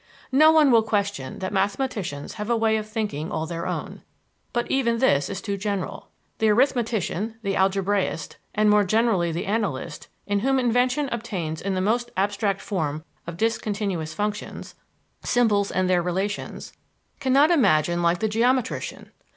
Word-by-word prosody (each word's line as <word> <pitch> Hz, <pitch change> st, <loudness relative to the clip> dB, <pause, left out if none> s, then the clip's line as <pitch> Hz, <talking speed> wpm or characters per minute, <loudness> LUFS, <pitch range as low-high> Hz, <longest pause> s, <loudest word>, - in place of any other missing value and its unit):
No 305 Hz, +4 st, +7 dB
one 310 Hz, -4 st, +5 dB
will 230 Hz, -1 st, +6 dB
question 205 Hz, -10 st, -2 dB
that 185 Hz, +1 st, -4 dB
mathematicians 195 Hz, -, -2 dB
have 210 Hz, -, -4 dB
a 235 Hz, -, +3 dB
way 220 Hz, -1 st, +2 dB
of 215 Hz, 0 st, -5 dB
thinking 210 Hz, -9 st, -3 dB
all 160 Hz, -, -2 dB
their 170 Hz, +1 st, -4 dB
own; -, -, -5 dB, 0.5 s
but 240 Hz, 0 st, 0 dB
even 235 Hz, -4 st, +2 dB
this 145 Hz, -, +2 dB
is 195 Hz, -, -5 dB
too 200 Hz, -2 st, -2 dB
general. 200 Hz, -1 st, -3 dB, 0.3 s
The 220 Hz, -1 st, +3 dB
arithmetician, 225 Hz, -, +1 dB
the 200 Hz, -1 st, -1 dB
algebraist, 195 Hz, -3 st, 0 dB, 0.2 s
and 215 Hz, 0 st, +3 dB
more 210 Hz, 0 st, +5 dB
generally 200 Hz, -4 st, +2 dB
the 165 Hz, -, -3 dB
analyst, 190 Hz, -, -2 dB, 0.2 s
in 205 Hz, 0 st, 0 dB
whom 270 Hz, +5 st, +2 dB
invention 250 Hz, +3 st, +2 dB
obtains 180 Hz, -9 st, -4 dB
in 195 Hz, 0 st, -2 dB
the 185 Hz, -, 0 dB
most 240 Hz, +5 st, 0 dB
abstract 200 Hz, 0 st, 0 dB
form 155 Hz, -5 st, -3 dB, 0.2 s
of 170 Hz, 0 st, -6 dB
discontinuous 205 Hz, -6 st, -1 dB
functions 210 Hz, 0 st, -4 dB, 0.5 s
symbols 210 Hz, -5 st, +2 dB
and 185 Hz, 0 st, 0 dB
their 180 Hz, -1 st, +3 dB
relations 190 Hz, +4 st, -3 dB, 0.5 s
cannot 275 Hz, +4 st, +4 dB
imagine 175 Hz, -, +3 dB
like 170 Hz, +1 st, +2 dB
the 220 Hz, -, +2 dB
geometrician. 245 Hz, +4 st, -1 dB
205 Hz, 155 wpm, -24 LUFS, 185-230 Hz, 0.5 s, No